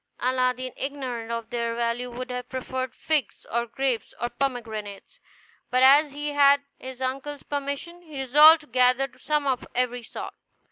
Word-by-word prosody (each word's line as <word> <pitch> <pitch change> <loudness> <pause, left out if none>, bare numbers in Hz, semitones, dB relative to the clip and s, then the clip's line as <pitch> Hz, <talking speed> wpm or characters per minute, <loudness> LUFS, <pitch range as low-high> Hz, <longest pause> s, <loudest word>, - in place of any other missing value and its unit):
Aladdin, 255 0 0
ignorant 255 -5 -4
of 230 -1 -4
their 235 -1 -2
value, 235 +1 -1
would 250 +1 -6
have 250 0 -5
preferred 260 -1 -4
figs, 300 -8 -1
or 235 +1 0
grapes, 255 -3 -2
or 240 - -1
pomegranates; 220 -7 -5 0.5
but 255 +1 +3
as 280 +2 +6
he 295 +1 -3
had 285 -1 +5 0.2
his 260 0 -7
uncle's 275 +2 -4
permission, 285 +5 -4
he 310 -5 -11
resolved 300 +5 +7
to - - -16
gather 255 +1 +3
some 300 -1 0
of 260 -3 0
every 245 0 0
sort. 225 - -8
255 Hz, 155 wpm, -25 LUFS, 240-280 Hz, 0.5 s, resolved